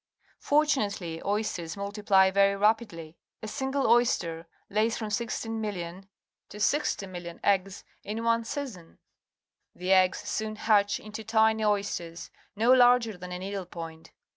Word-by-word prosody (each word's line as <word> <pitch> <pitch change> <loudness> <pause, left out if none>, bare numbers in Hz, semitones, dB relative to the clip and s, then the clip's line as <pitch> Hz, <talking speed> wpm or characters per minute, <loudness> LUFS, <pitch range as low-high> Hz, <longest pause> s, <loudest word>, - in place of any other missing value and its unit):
Fortunately, 210 - 0
oysters 200 -5 -2
multipl}^ 200 -1 +2
very 200 0 +3
rapidlj'. 205 -7 0 0.3
A - - -4
single 265 +3 -2
oj^ster 175 -9 +2 0.2
lays 220 +3 +1
from 215 -2 -5
16, 225 0 -3
000, 215 -1 -1
000 175 0 -6 0.5
to 205 - -10
60,000,000 185 - -1
eggs 195 -1 +1 0.2
in 220 +2 -4
one 230 0 +2
season. 230 - -7 0.8
The 180 +1 -3
eggs 185 -1 +4
soon 215 0 -3
hatch 205 -2 +2
into 215 +1 -8
tiny 220 0 +2
oysters 200 -5 -2 0.2
no 230 +4 +3
larger 245 -3 +5
than 180 0 -9
a 180 - -4
needle 190 0 -5
point. 165 -2 -9
205 Hz, 135 wpm, -28 LUFS, 185-225 Hz, 0.8 s, larger